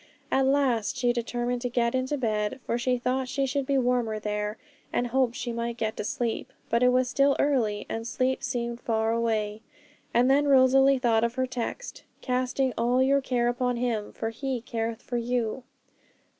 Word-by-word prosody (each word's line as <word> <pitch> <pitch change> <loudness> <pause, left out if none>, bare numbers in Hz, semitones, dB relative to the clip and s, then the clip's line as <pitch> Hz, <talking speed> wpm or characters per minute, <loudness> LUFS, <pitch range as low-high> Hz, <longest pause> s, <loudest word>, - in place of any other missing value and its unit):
At 265 0 +3
last 265 -6 +1
she 245 -1 +2
determined 240 +1 -2
to 245 - -2
get 235 -1 +1
into 260 +3 -1
bed, 215 -2 -1
for - - -1
she 250 0 +1
thought 255 +2 -1
she 275 0 0
should 270 0 -2
be 275 - +2
warmer 245 -3 +1
there, 210 0 -3 0.3
and 245 - 0
hoped 245 0 +1
she 240 - -3
might 235 0 -3
get 220 -1 -2
to - - -2
sleep; 240 -1 -2 0.2
but 235 +1 +3
it 250 - +5
was 255 0 +2
still 275 +2 +3
early, 235 -8 +1
and 225 +1 -4
sleep 260 +2 0
seemed 235 -2 -3
far 220 -1 0
away. 220 -2 -1 0.5
And 245 +2 +3
then 285 +2 +4
Rosalie 270 0 +5
thought 230 -3 +2
of 235 +1 0
her 260 -1 +1
text, 255 - -5 0.2
'Casting 255 0 0
all 245 +2 +3
your 275 +1 +3
care 245 -2 0
upon 245 0 0
Him, 235 -4 -2
for 225 0 -4
He 260 +1 -3
careth 230 0 -4
for 245 - -3
you.' 240 0 -1
245 Hz, 185 wpm, -27 LUFS, 230-260 Hz, 0.5 s, it